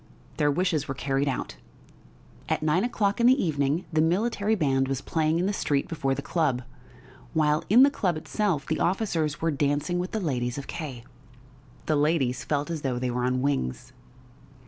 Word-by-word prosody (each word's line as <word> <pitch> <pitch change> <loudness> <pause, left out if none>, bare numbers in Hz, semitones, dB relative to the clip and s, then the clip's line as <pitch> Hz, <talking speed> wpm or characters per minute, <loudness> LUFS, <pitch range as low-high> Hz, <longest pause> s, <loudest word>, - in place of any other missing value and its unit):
Their 145 - +3
wishes 160 0 0
were 135 - -3
carried 135 +1 -1
out. 125 - -3 0.9
At - - 0
nine 155 +5 +2
o'clock 220 -2 0
in 235 - +6
the 260 +2 +5
evening 150 +1 0
the 155 - +3
military 205 +5 +1
band 135 -7 +1
was 135 -1 -1
playing 155 +2 0
in 175 - +1
the 200 - 0
street 145 -7 0
before 135 -5 -1
the 140 - -5
club, 140 -6 0 0.7
while 150 -1 +2
in 240 +6 +8
the 280 - +5
club 180 - 0
itself 165 -3 -1
the 160 - -2
officers 170 -6 0
were 165 0 +1
dancing 145 +4 0
with 180 +1 -2
the 220 - -2
ladies 125 - -2
of 140 - -5
K. 140 -8 -6 0.8
The 155 - +1
ladies 145 -5 +1
felt 145 +2 -1
as 160 -3 -3
though 130 -3 -1
they 125 0 -1
were 125 0 -1
on 125 0 0
wings. 135 - -2
155 Hz, 185 wpm, -26 LUFS, 135-180 Hz, 0.9 s, in